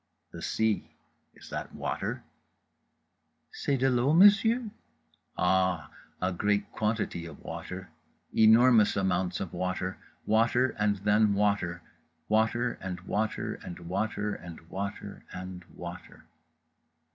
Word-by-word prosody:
The - - -9
sea: 110 -2 0 0.5
is - - -14
that - - -5
water?—"c'est 140 - -6
de 130 +1 +2
l'eau, 130 +3 +3
monsieur?" 215 +5 +5 0.7
Ah: 95 -3 +1 0.3
a 90 0 0
great 105 +3 0
quantity 105 -6 -2
of 80 - -11
water; 90 0 -7 0.5
enormous 110 0 +6
amounts 95 -2 0
of 95 - -5
water, 90 +1 -2 0.3
water 115 +4 +3
and 105 -1 +2
then 105 0 +4
water; 100 -4 0 0.5
water 115 +3 +1
and 90 -2 -4
water 105 +3 -2
and 90 - -7
water 105 +4 -2
and 85 -4 -9
water 100 +2 -5
and 90 0 -7
water. - - -10
105 Hz, 110 wpm, -29 LUFS, 90-110 Hz, 0.7 s, enormous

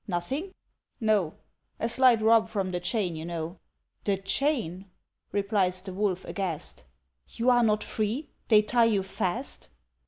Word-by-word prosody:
"Nothing?" 265 - -3 0.4
"No!" 210 -8 +1 0.4
"A 230 - 0
slight 240 -2 +4
rub 220 0 +5
from 195 -4 -2
the 180 - -1
chain, 185 -3 -1
you 160 - -6
know." 170 +1 -5 0.5
"The 200 -2 +2
chain!" 195 - -1 0.4
replies 200 -3 +1
the 190 0 -7
Wolf, 190 -2 -1
aghast; 165 - -4 0.4
"You 245 +2 +1
are 245 -1 +5
not 215 -2 +2
free? 225 +8 -2 0.2
they 215 -2 +6
tie 235 +2 +3
you 210 -4 +2
fast?" 185 -2 -3
205 Hz, 145 wpm, -28 LUFS, 185-230 Hz, 0.5 s, they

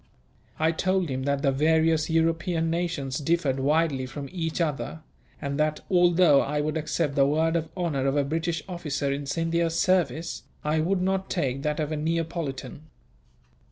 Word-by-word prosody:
I 160 +1 +2
told 185 +1 0
him 130 0 -3
that 140 -1 0
the 135 - +3
various 160 +3 +2
European 165 +1 +1
nations 165 -6 -2
differed 150 -3 +1
widely 140 -1 +1
from 140 +1 -7
each 165 -3 -3
other; 160 0 -2 0.4
and 140 -1 -3
that, 155 0 +1
although 175 -5 +5
I 150 +1 -1
would 150 +1 -1
accept 155 -1 -1
the 140 0 +4
word 160 +3 +1
of 160 -1 -1
honour 150 -7 0
of 135 +2 +1
a 145 - +3
British 165 +2 -2
officer 150 -6 -2
in 140 0 -5
Scindia's 165 +2 0
service, 165 -5 +1 0.2
I 150 +1 +1
would 180 +3 +1
not 190 0 0
take 135 -6 -1
that 150 +1 -1
of 155 0 -1
a 155 - -1
Neapolitan. 155 -3 -3
160 Hz, 165 wpm, -26 LUFS, 140-170 Hz, 0.4 s, although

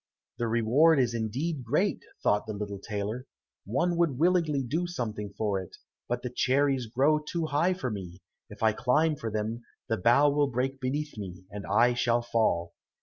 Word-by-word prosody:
"The 120 - 0
reward 125 +8 +4
is 120 -2 +2
indeed 125 +7 -2
great," 115 - +1 0.2
thought 105 +1 +2
the 110 - -3
little 100 -1 -5
tailor; 105 +5 -4 0.4
"one 170 - 0
would 165 -7 +2
willingly 160 -4 +2
do 160 +8 -1
something 110 - -4
for 100 -3 0
it, 90 - -12 0.3
but - - -2
the 125 - -4
cherries 135 0 +1
grow 140 +7 +3
too 160 +2 -3
high 155 +5 +1
for 130 -9 -3
me, 95 -3 -7 0.3
if - - -9
I 110 -1 +4
climb 150 +8 +2
for 115 -5 -4
them, 110 +2 -3 0.3
the 110 - +1
bough 120 +9 +4
will 145 0 +2
break 130 +2 -2
beneath 140 0 -3
me, 95 -2 -8
and 100 -1 -7
I 120 +5 +4
shall 120 -1 +1
fall." 85 -8 0
120 Hz, 180 wpm, -28 LUFS, 110-145 Hz, 0.4 s, reward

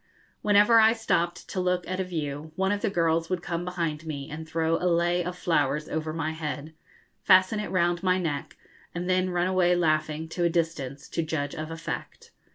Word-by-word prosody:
Whenever 210 +2 +6
I 220 0 +6
stopped 180 -6 -1
to 190 - -3
look 180 -1 0
at 185 0 -3
a - - +1
view, 155 -4 -4
one 190 +2 +1
of 205 0 -1
the - - +1
girls 165 -3 +1
would 180 -2 -2
come 170 0 -3
behind 170 -4 -3
me 140 -3 -5
and 160 +1 -7
throw 165 0 +1
a 180 - 0
lei 175 +1 +2
of 180 +1 -5
flowers 150 -3 +1
over 155 0 -3
my 160 0 -2
head, 155 -1 -5 0.5
fasten 185 +2 +5
it 210 - -4
round 175 -1 +1
my 185 -1 +2
neck, 160 -6 -3 0.4
and 175 +1 -3
then 185 0 +2
run 175 0 +1
away 180 -1 +3
laughing, 155 -2 0
to 175 +1 -2
a 170 - +4
distance, 160 -5 -2
to 165 - -1
judge 155 -3 -2
of 155 +1 -5
effect. 165 0 -6
170 Hz, 200 wpm, -27 LUFS, 155-180 Hz, 0.5 s, Whenever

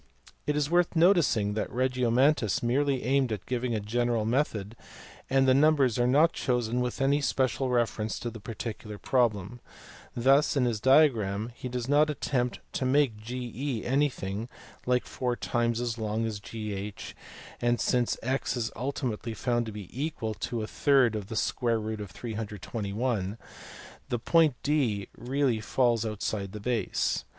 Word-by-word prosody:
It 150 - +1
is 150 -1 +1
worth 175 +2 +2
noticing 160 - +4
that 110 - -2
Regiomontanus 125 -1 +2
merely 135 +2 +1
aimed 135 -1 +2
at 105 -3 -4
giving 125 -1 -1
a - - 0
general 115 +1 0
method, 115 -4 -1 0.5
and 135 0 +3
the 130 - +6
numbers 140 -4 +4
are 120 - +3
not 150 +6 +4
chosen 125 -1 0
with 125 -1 -2
any 140 +2 +3
special 130 -1 0
reference 115 -3 0
to 120 - -3
the 115 - -9
particular 110 -1 -6
problem. 115 -2 0 0.6
Thus 135 +5 +3
in 130 - +3
his 115 -3 0
diagram 115 -5 +3
he 125 - -7
does 125 -1 -3
not 150 +2 +4
attempt 125 -4 -1
to - - -2
make 130 -2 +3
GE 125 +2 -4
anything 120 -6 -1 0.4
like 125 0 +2
four 125 -2 -2
times 120 -1 0
as 120 -1 -2
long 110 +1 -1
as 110 -2 -3
GH, 105 -2 -6 0.5
and, 120 0 +2
since 125 -2 +1
x 130 +1 -1
is 115 -2 -2
ultimately 120 -3 -3
found 120 +1 0
to - - -5
be 105 -3 -8
equal 130 -5 -3
to 120 - -5
^ - - 0
V321, 110 - -1 0.7
the 120 - 0
point 160 +2 +3
D 125 -10 0
really 130 -2 0
falls 120 0 +2
outside 105 -2 -3
the 105 - -6
base. 110 -3 -1
120 Hz, 145 wpm, -28 LUFS, 110-135 Hz, 0.7 s, the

